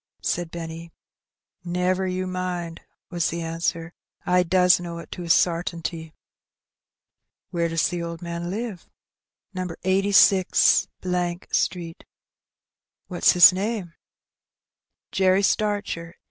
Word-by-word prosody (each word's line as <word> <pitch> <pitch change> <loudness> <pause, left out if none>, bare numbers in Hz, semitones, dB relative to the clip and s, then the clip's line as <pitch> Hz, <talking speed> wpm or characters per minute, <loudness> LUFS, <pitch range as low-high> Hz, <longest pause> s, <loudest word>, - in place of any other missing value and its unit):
said 175 -1 -1
Benny. 165 0 -8 0.7
"Never 180 +2 0
you 185 0 -2
mind," 180 -2 -4 0.3
was 175 -2 0
the 170 0 -4
answer 165 0 -3 0.4
j - - -3
"I 180 0 +5
does 180 0 +4
know 170 -1 -6
it 170 - -10
to - - -7
a 170 - -7
sartinty." 165 -2 0 1.4
"Where 170 -1 0
does 165 -1 +1
the 175 -1 -4
old 170 -1 -5
man 170 0 -5
live?" 210 -2 -5 0.7
^^No. 180 -2 -4
86 190 0 +4 0.7
Street." 170 -3 -2 1.0
"What's 180 - +3
his 180 0 +8
name?" 195 -2 -3 1.2
Jerry 190 +1 +3
Starcher. 200 -5 -1
175 Hz, 110 wpm, -24 LUFS, 170-185 Hz, 1.4 s, his